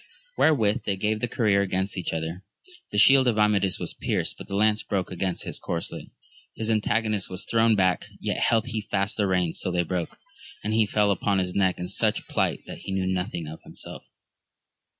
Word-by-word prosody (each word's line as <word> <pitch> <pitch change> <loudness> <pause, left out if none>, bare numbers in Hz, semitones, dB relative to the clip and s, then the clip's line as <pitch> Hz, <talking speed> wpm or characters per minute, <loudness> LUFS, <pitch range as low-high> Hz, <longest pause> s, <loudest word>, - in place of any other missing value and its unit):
Wherewith 115 -7 +2
they 100 - 0
gave 105 +2 0
the 120 - -1
career 105 -4 +2
against 95 0 -1
each 90 -3 -3
other; 80 +3 -4 0.5
the - - -4
shield 135 +4 +7
of. 115 -3 +2
Amadis 105 -3 +3
was - - -3
pierced, - - -2
but - - -10
the 100 - -4
lance 105 +1 +3
broke 95 -3 -2
against 90 0 -2
his - - -5
corslet; 85 -1 -4 0.5
his 110 0 -1
antagonist 110 -1 0
was 95 +2 -4
thrown 115 -1 +3
back, 95 -2 +1
yet - - -2
held 115 -1 +2
he 115 -4 -3
fast 100 -1 -1
the 100 -2 +1
reins 90 -3 0
till 90 - -2
they 90 0 +2
broke, 90 0 -3 0.5
and 105 - -1
he 110 -1 +3
fell 105 -1 +2
upon 100 +1 +1
his 90 -1 -1
neck 95 -2 +2
in 90 - -4
such - - 0
plight - - 0
that - - -8
he 100 - -7
knew 95 -1 0
nothing 90 -2 -3
of 80 +1 -9
himself. - - -9
100 Hz, 200 wpm, -26 LUFS, 90-110 Hz, 0.5 s, shield